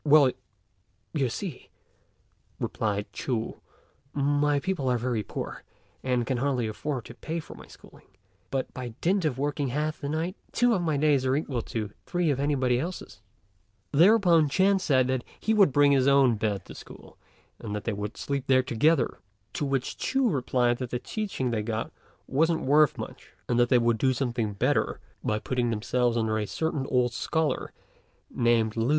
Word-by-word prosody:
"Well, 145 -3 +6 0.8
you 140 -5 +1
see," 160 - -6 0.9
replied 105 -2 -2
Ch'u, 115 -4 -3 0.5
"my 145 +1 +2
people 170 -5 -1
are 125 - +2
very 120 -2 -1
poor, - - -6 0.4
and 125 -2 0
can 130 0 -1
hardly 130 -2 0
afford 125 +3 -4
to - - -10
pay 160 +7 -4
for 155 - -10
my - - -13
schooling; - - -17 0.4
but, 135 -1 -3
by 125 -3 -6
dint 185 +1 +2
of 140 -5 0
working 145 +1 -1
half 150 +5 -2
the 140 - -3
night, 165 +5 -2 0.2
two 245 0 +3
of 190 - +1
my 155 -4 0
days 145 -2 +3
are 130 0 +2
equal 140 -5 -2
to 110 -3 -3 0.2
three 175 -3 +1
of 135 - -1
anybody 130 -4 +1
else's." 160 - -6 0.7
Thereupon 170 -2 +5
Ch'ên 190 +5 +3
said 130 -5 +2 0.2
he 220 - +1
would 200 -8 +5
bring 145 +1 +5
his 135 -1 +3
own 135 -4 +5
bed 105 -2 -2
to - - -22
the - - -9
school, - - -13 0.4
and 105 -2 -5
that 105 - -4
they 115 - -1
would 105 +3 -5
sleep 140 -2 -3
there 130 -1 +4
together; 130 - +2 0.3
to 145 - -2
which 135 -2 -2
Ch'u 265 -1 +1
replied 125 -3 +1
that 125 -2 -4
the 125 - -1
teaching 135 - -3
they 110 -2 0
got 110 +1 -3 0.3
wasn't 160 +4 +1
worth 150 +2 +4
much, - - -9
and 120 0 +1
that 120 0 +4
they 125 - +5
would 115 -2 +2
do 130 -1 +3 0.4
better - - +1 0.2
by 105 - 0
putting 120 +2 -1
themselves 120 +2 0
under 110 -1 0
a 105 - -2
certain 155 -1 -2
old 125 -2 +2
scholar 160 +5 -1 0.6
named 115 -2 +2
Lü. 115 +2 0
130 Hz, 175 wpm, -27 LUFS, 120-155 Hz, 0.9 s, Well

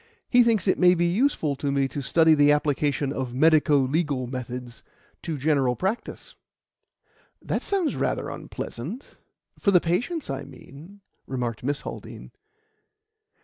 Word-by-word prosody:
He 245 - +6
thinks 225 -5 +2
it 185 - +2
may 180 0 +6
be 175 0 +1
useful 175 - +1
to 140 0 -2
me 140 -1 +1
to 145 - -5
study 160 +4 +4
the 145 -1 +5
application 145 -1 0
of 130 -3 -4
medico 155 0 +4
legal 140 -1 0
methods 125 -1 -7 0.4
to 160 -3 -4
general 135 -3 +1
practice." 195 - -4 1.1
"That - - -3
sounds 380 -6 0
rather - - -1
unpleasant 170 - -7 0.4
for 200 - +2
the 185 -3 +6
patients, 240 - -2
I 135 0 -4
mean," 140 +8 -14 0.3
remarked 120 -4 -3
Miss 140 +2 -1
Haldean. - - -9
150 Hz, 140 wpm, -25 LUFS, 135-180 Hz, 1.1 s, He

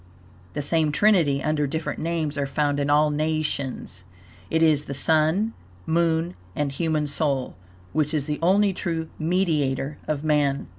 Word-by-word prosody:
The 145 - -2
same 155 0 +2
trinity, 150 -6 +3
under 150 -1 0
different 160 +3 -3
names, 160 -2 -2
are 140 -1 -1
found 145 0 0
in 140 0 0
all 150 +1 +4
nations. 150 -9 -2 0.5
It 160 0 +2
is 150 -2 +3
the 140 - -5
Sun, 160 +9 +2 0.3
Moon 165 +1 +1 0.2
and 145 -1 -1
Human 155 +1 0
Soul, 140 -2 -1 0.4
which 150 -1 +1
is 150 -3 0
the 150 0 -3
only 195 +3 +3
true 165 -3 -3
mediator 155 -5 0
of 150 -1 -2
Man. 145 -3 +1
155 Hz, 150 wpm, -24 LUFS, 145-165 Hz, 0.5 s, all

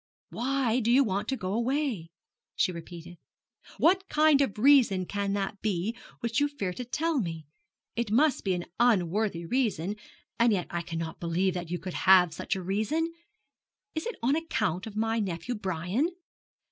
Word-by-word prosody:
'Why 255 -1 0
do 230 -1 0
you 260 +3 +6
want 200 -4 -2
to 265 - -1
go 185 -2 -3
away?' 235 - -1 0.5
she - - +2
repeated. 170 0 -10 0.6
'What 380 +3 +3
kind 300 -2 +4
of 265 -8 0
reason 230 -7 +5
can 200 +1 -2
that 200 0 -3
be 210 +1 -1 0.3
which 235 +1 0
you 290 - +3
fear 210 -11 -4
to 250 - -5
tell 310 +5 0
me? 165 -6 -4 0.5
It 235 -1 -1
must 270 +7 +3
be 190 -2 +1
an 175 - -4
unworthy 200 -5 +2
reason; 210 -4 0 0.4
and 235 0 +5
yet 185 -4 0
I 170 - -2
cannot 165 -1 -5
believe 175 +2 0
that 175 -2 -5
you 175 - -1
could 185 0 -7 0.2
have 180 -3 +7
such - - -2
a 190 - -5
reason. 255 - -1 0.8
Is 315 +6 -3
it 475 - -4
on 265 +5 +3
account 215 - -1
of 215 - -9
my 225 +1 0
nephew 190 +3 -3
Brian? 195 - -1
210 Hz, 170 wpm, -28 LUFS, 180-260 Hz, 0.8 s, have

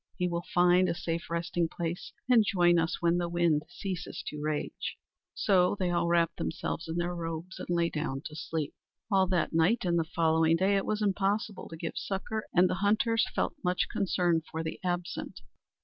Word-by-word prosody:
He 180 - +1
will 170 0 -3
find 180 +1 +4
a - - 0
safe 170 -1 -3
resting 170 0 -1
place, 170 +1 -4 0.2
and 245 -3 +6
join 175 -4 +4
us 165 +1 -1
when 170 +1 +3
the 175 -1 -1
wind 170 -3 +2
ceases 185 0 -5
to 150 - -5
rage." 150 -1 -3 0.4
So 185 -2 +3
they 180 -2 0
all 175 -1 +1
wrapped 170 -1 +2
themselves 165 -1 -3
in 160 - -3
their 175 +1 -1
robes 165 +2 -5
and - - -7
lay 170 -1 +1
down 145 -2 -3
to 150 - -7
sleep. 160 -1 -3 0.4
All 190 -1 +4
that 180 -3 0
night 170 +7 +3
and 170 -1 +2
the - - +2
following 160 0 +2
day 190 +4 +2
it 195 - 0
was 215 0 0
impossible 205 +2 0
to 165 - -8
give 165 0 -4
succor, 215 +3 -3
and 180 +1 +5
the - - -1
hunters 225 +3 +3
felt - - 0
much 180 0 +1
concern 175 -3 +1
for 160 0 -3
the 160 - -5
absent. 175 -1 -3
175 Hz, 195 wpm, -30 LUFS, 165-185 Hz, 0.4 s, and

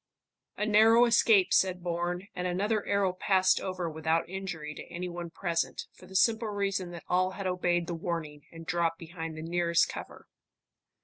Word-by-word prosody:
"A 210 - 0
narrow 220 +3 +6
escape," 220 -5 +4
said 185 -2 +2
Bourne, 175 +2 -2
and 180 -1 -3
another 205 +4 0
arrow 200 -2 +1
passed 185 0 +2
over 185 -2 -3
without 160 +1 0
injury 175 -5 -5
to - - -9
any 180 +1 -4
one 175 -1 -6
present, 170 -1 -2
for 185 - -16
the 190 - -13
simple 225 +3 +3
reason 195 -3 -2
that 170 -1 -9
all 185 +1 +2
had 195 - -5
obeyed 175 -1 0
the 170 - -4
warning 165 -3 -5
and 165 0 -10
dropped 165 -1 0
behind 165 -1 -7
the 155 - -6
nearest 170 0 +2
cover. - - -9
180 Hz, 175 wpm, -29 LUFS, 170-195 Hz, -, narrow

